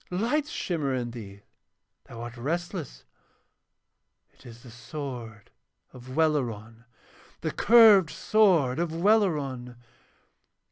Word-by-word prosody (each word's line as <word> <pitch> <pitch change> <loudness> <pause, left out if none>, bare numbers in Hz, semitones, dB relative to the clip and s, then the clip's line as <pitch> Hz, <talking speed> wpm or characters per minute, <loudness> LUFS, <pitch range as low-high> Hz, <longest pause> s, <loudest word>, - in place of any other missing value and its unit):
Lights 245 +11 -1
shimmer 150 -7 -2
in 120 -2 -4
thee, 100 -4 -10 0.6
thou 115 -1 -10
art 120 0 -8
restless. 160 - -5 1.3
It - - -18
is 115 0 -13
the 120 - -13
sword 120 -4 -8 0.4
of 130 +1 -11
Welleran, 115 -8 -1 0.6
the - - -2
curved 215 -7 +6
sword 170 - +2
of 170 -1 -1
Welleran!' 160 - 0
135 Hz, 100 wpm, -26 LUFS, 120-175 Hz, 1.3 s, curved